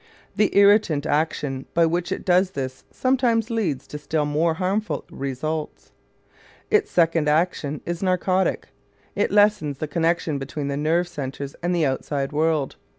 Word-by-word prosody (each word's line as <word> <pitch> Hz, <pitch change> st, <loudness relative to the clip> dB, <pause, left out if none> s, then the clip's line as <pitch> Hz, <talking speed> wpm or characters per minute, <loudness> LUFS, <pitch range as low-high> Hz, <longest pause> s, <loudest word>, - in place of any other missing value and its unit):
The 210 Hz, -2 st, +2 dB
irritant 200 Hz, -7 st, +4 dB
action 145 Hz, -3 st, -1 dB
by 170 Hz, 0 st, +5 dB
which 175 Hz, +2 st, -1 dB
it -, -, -3 dB
does 185 Hz, +1 st, +3 dB
this 130 Hz, -6 st, -6 dB
sometimes 245 Hz, -3 st, +1 dB
leads 175 Hz, -, -1 dB
to 150 Hz, -, -8 dB
still 150 Hz, +1 st, -1 dB
more 160 Hz, +3 st, +1 dB
harmful 185 Hz, -4 st, -2 dB
results. 150 Hz, +3 st, -4 dB, 0.8 s
Its 425 Hz, -1 st, +3 dB
second 165 Hz, -3 st, +2 dB
action 150 Hz, -2 st, 0 dB
is 175 Hz, 0 st, -4 dB
narcotic: 185 Hz, 0 st, 0 dB, 0.5 s
it -, -, +1 dB
lessens 205 Hz, -9 st, +3 dB
the 155 Hz, -, -3 dB
connection 165 Hz, -1 st, 0 dB
between 140 Hz, +1 st, -4 dB
nerve 170 Hz, +3 st, +1 dB
centers 140 Hz, -4 st, -6 dB
and 175 Hz, +1 st, 0 dB
the 165 Hz, -3 st, +2 dB
outside 135 Hz, +1 st, -2 dB
world. 155 Hz, -2 st, 0 dB
160 Hz, 145 wpm, -23 LUFS, 145-185 Hz, 0.8 s, by